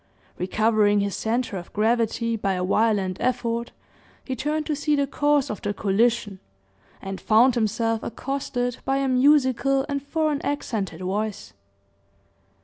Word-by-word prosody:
Recovering 210 +2 +2
his 200 -1 -2
centre 225 -2 -1
of 175 - -9
gravity 230 +1 +1
by 200 -3 -1
a 180 - -2
violent 195 -2 +1
effort, 235 -2 -1 0.5
he 260 - -3
turned 300 +4 -2
to 300 - -1
see 300 +1 +1
the 280 -1 +1
cause 290 0 +1
of 210 - -6
the 205 0 -2
collision, 205 0 +1 0.6
and 195 -1 -6
found 235 +4 +5
himself 225 0 0
accosted 245 -2 -3
by 270 0 0
a 275 0 0
musical 270 0 +3
and 280 -1 -2
foreign 300 0 -1
accented 210 - -3
voice. 195 - -3
230 Hz, 140 wpm, -24 LUFS, 205-270 Hz, 0.6 s, found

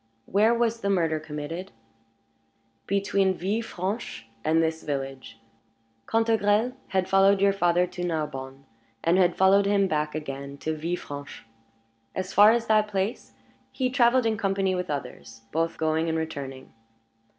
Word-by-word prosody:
"Where 210 - +3
was 235 -1 +1
the 200 - -1
murder 165 -5 +1
committed?" 155 +4 -6 1.2
"Between 195 -1 +1
Villefranche 205 +1 -3 0.2
and 160 +1 +2
this 160 0 0
village. 135 -5 -5 0.7
Cantegrel 225 +1 +2
had 190 -1 0
followed 195 +1 +4
your 200 0 +4
father 175 -2 +2
to 180 0 -7
Narbonne, 140 -5 -4 0.4
and 170 +3 +3
had 175 -2 +3
followed 195 +1 +5
him 200 -1 +3
back 150 -3 -1
again 140 -2 -6
to 155 +2 -3
Villefranche. 150 -5 -6 0.7
As 190 0 -4
far 205 +1 +8
as 230 0 +1
that 215 -1 +3
place, 200 +2 -3 0.4
he 255 -2 -1
traveled 250 -1 +4
in 220 -1 +1
company 195 -1 0
with 180 0 -3
others, 125 -5 -6
both 165 +1 -1
going 160 +1 0
and 160 - 0
returning. 140 -5 -6
180 Hz, 140 wpm, -26 LUFS, 155-200 Hz, 1.2 s, far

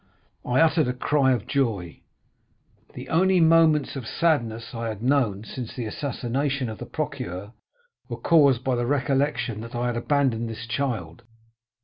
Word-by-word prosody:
I 125 +1 +1
uttered 160 -3 +3
a 125 - 0
cry 135 +1 +2
of 120 -5 0
joy; 110 - -2 0.9
the - - -8
only 185 +3 +3
moments 160 -3 +4
of 130 -5 -6
sadness 115 -10 0
I 115 0 -3
had 110 -1 -5
known 125 -7 +1
since 115 +1 -7
the 125 - -4
assassination 135 +2 -2
of 110 - -7
the - - -7
procureur 125 - -5 0.6
were - - -4
caused 140 -7 +4
by 130 - 0
the 120 -1 0
recollection 135 -4 0
that 115 +1 -8
I 120 +1 -1
had 120 -1 -1
abandoned 120 -3 0
this 115 0 -7
child. 115 - -3
125 Hz, 155 wpm, -25 LUFS, 115-145 Hz, 0.9 s, moments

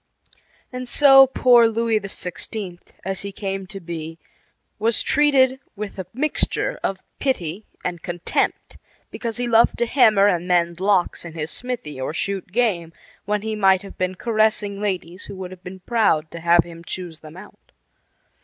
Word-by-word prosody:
And 250 0 -5
so 270 0 +7
poor 245 -2 +5
Louis 225 0 +1
XVI., 195 -1 -5 0.3
as 190 0 -2
he 200 - -5
came 195 -1 -4
to 195 -1 -7
be, 165 -2 -7 0.6
was 225 +1 +1
treated 265 -3 +3 0.2
with 205 -1 -6
a 185 - -5
mixture 305 - -1
of 190 -1 -2 0.2
pity 200 - -2 0.2
and 175 -2 -3
contempt 175 0 -2 0.3
because 230 -3 -4
he 245 0 -1
loved 230 0 +4
to 240 - +1
hammer 225 -5 +5
and 180 -3 0
mend 170 -1 +1
locks 195 -2 +1
in 170 -2 -9
his 160 -1 -4
smithy 220 - -5
or 140 +5 -3
shoot 195 -1 -3
game 185 -8 0 0.3
when 210 0 -1
he 220 0 -2
might 190 -2 +3
have 195 - -12
been 185 0 -1
caressing 215 -2 0
ladies 185 -3 -3
who - - -8
would 185 -1 -7
have 185 0 -12
been 185 +1 -9
proud 180 -8 +1
to 170 - -7
have 170 0 +4
him 170 -1 -12
choose 175 -3 -6
them 155 +2 -13
out. - - -15
195 Hz, 165 wpm, -22 LUFS, 175-230 Hz, 0.6 s, so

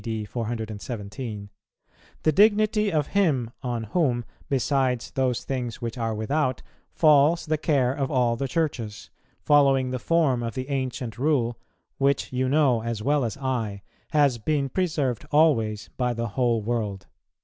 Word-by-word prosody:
D. 110 -2 -3
417), 110 -1 -5 0.7
"the 155 - +4
dignity 210 +3 +3
of 150 -3 +1
him 145 - +2
on 120 -2 -3
whom, 120 - 0 0.2
beside 130 -2 +1
those 130 -3 0
things 125 -4 -4
which 115 -1 -4
are 115 -3 -2
without, 130 +4 -1 0.3
falls 155 +1 +4
the 155 -1 0
care 135 -5 +2
of 135 -2 -2
all 125 -3 +2
the 135 +3 -2
Churches; 125 -9 -3 0.3
following 135 -3 +4
the 130 - -2
form 145 -4 +2
of 115 -2 -4
the 130 +2 -4
ancient 125 -4 -3
rule, 130 -5 +1 0.4
which 140 -1 +1
you 130 0 0
know, 135 -5 +3
as 115 -2 -4
well 145 +2 +2
as 115 +2 -3
I, 115 -7 -3 0.3
has 145 -6 +3
been 140 +2 0
preserved 150 - -1
always 115 -9 +2
by 125 -1 0
the 115 0 -2
whole 115 0 +1
world." 105 -4 -2
130 Hz, 150 wpm, -25 LUFS, 115-145 Hz, 0.7 s, the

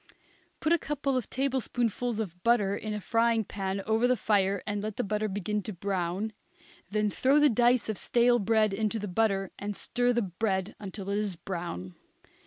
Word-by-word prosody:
Put 310 - +3
a 340 - +3
couple 285 -2 -1
of 255 - -2
tablespoonfuls 245 -3 -1
of 180 -5 -5
butter 210 -4 +3
in 215 +1 -4
a - - -3
frying 230 +2 +2
pan 195 0 -3
over 220 +2 +3
the 255 - +3
fire 200 -2 +1
and 205 -1 -2
let 215 0 -4
the - - 0
butter 210 +1 -1
begin 205 +1 -2
to 210 +2 -6
brown, 190 +2 -2 0.6
then 210 +1 +1
throw 270 +7 +3
the 295 -2 +5
dice 240 +1 +3
of 215 -3 -3
stale 240 0 +3
bread 215 0 +2
into 215 +2 0
the 210 -1 -4
butter 195 -1 +1
and 205 0 -4
stir 245 0 +1
the 240 -1 +1
bread 190 +1 -1
until 195 -1 -7
it 205 - +1
is 205 -3 -1
brown. 170 - -5
210 Hz, 190 wpm, -29 LUFS, 195-235 Hz, 0.6 s, the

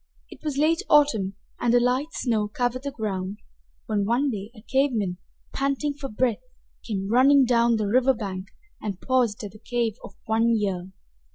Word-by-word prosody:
It - - -13
was 300 -3 -2
late 320 +3 +3
autumn, 225 -10 +4 0.2
and 240 0 +2
a - - +7
light 250 +4 +1
snow 220 -4 0
covered 245 +3 -1
the 280 +1 -4
ground, 200 -4 -3 0.5
when 210 -2 0
one 245 +7 +1
day 205 -2 -5
a 215 - -14
cave 270 +2 +1
man, 190 -5 -2 0.3
panting 275 +2 0
for 275 -1 -7
breath, 235 +2 0 0.4
came 195 -4 -3
running 265 +5 +5
down 235 -1 +3
the 215 -1 0
river 255 +5 +3
bank 195 -3 -5 0.3
and 200 -4 -4
paused 245 -5 +1
at 205 - -6
the 215 - -15
cave 230 -1 -1
of 195 - -11
One 225 +1 +2
Ear. 190 -3 -2
235 Hz, 180 wpm, -25 LUFS, 205-265 Hz, 0.5 s, a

